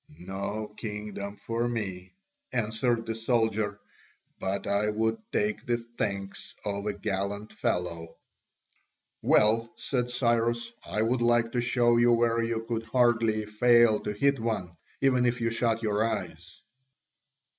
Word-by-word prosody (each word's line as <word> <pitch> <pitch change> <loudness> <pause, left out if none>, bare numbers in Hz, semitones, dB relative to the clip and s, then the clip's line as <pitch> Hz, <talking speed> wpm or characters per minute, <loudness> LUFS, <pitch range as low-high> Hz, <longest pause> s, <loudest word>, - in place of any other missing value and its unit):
"No 100 +4 -5
kingdom 105 -2 -5
for 115 +3 -2
me," 95 - -4 0.4
answered 115 0 0
the 115 - -2
soldier, 110 -3 0 0.6
"but 95 +1 -2
I 100 +1 +1
would 110 +1 0
take 210 0 0
the 120 -1 +2
thanks 105 -4 -5
of 100 0 -2
a 105 - 0
gallant 100 +1 -3
fellow." 85 -2 -2 1.0
"Well," 115 +2 +3
said 125 -2 -1
Cyrus, 120 -1 +1
"I 105 - -1
would 120 +2 +1
like 120 -1 +3
to 120 - 0
show 120 -1 +3
you 120 0 +5
where 115 0 +2
you 115 -1 -2
could 115 -1 -3
hardly 115 -2 +2
fail 120 +1 +5
to 105 - -3
hit 140 +6 +2
one, 105 -6 -2 0.3
even 130 -2 +3
if 120 0 0
you 115 -1 0
shut 115 0 0
your 105 0 +1
eyes." 90 -5 -4
110 Hz, 135 wpm, -28 LUFS, 105-120 Hz, 1.0 s, you